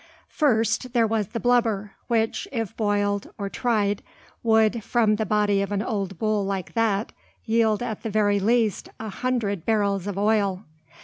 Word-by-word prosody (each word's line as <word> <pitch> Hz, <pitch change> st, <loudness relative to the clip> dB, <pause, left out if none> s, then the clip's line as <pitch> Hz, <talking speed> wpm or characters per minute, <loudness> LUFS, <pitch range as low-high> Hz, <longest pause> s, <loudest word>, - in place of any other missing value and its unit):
First, 235 Hz, -3 st, +1 dB
there 235 Hz, -2 st, +4 dB
was 220 Hz, -2 st, 0 dB
the 230 Hz, -, -4 dB
"blubber," 225 Hz, -5 st, +1 dB, 0.2 s
which, 225 Hz, -1 st, 0 dB
if 225 Hz, -7 st, -3 dB
boiled 205 Hz, -2 st, 0 dB
or 200 Hz, -1 st, -3 dB
"tried," 205 Hz, -3 st, 0 dB, 0.4 s
would, 220 Hz, -1 st, +3 dB
from 220 Hz, -3 st, +2 dB
the 220 Hz, -1 st, -2 dB
body 205 Hz, -1 st, +2 dB
of 200 Hz, -, -3 dB
an 205 Hz, 0 st, 0 dB
old 195 Hz, -6 st, -3 dB
bull 215 Hz, +1 st, 0 dB
like 195 Hz, -2 st, -3 dB
that, 220 Hz, -2 st, +1 dB, 0.3 s
yield 220 Hz, -1 st, +2 dB
at 220 Hz, -3 st, -4 dB
the 225 Hz, -, -4 dB
very 205 Hz, -1 st, +2 dB
least, 220 Hz, 0 st, +1 dB
a 220 Hz, -, -5 dB
hundred 210 Hz, -5 st, -2 dB
barrels 200 Hz, -3 st, 0 dB
of 200 Hz, -1 st, -4 dB
oil. 200 Hz, -2 st, +1 dB
215 Hz, 165 wpm, -24 LUFS, 200-225 Hz, 0.4 s, there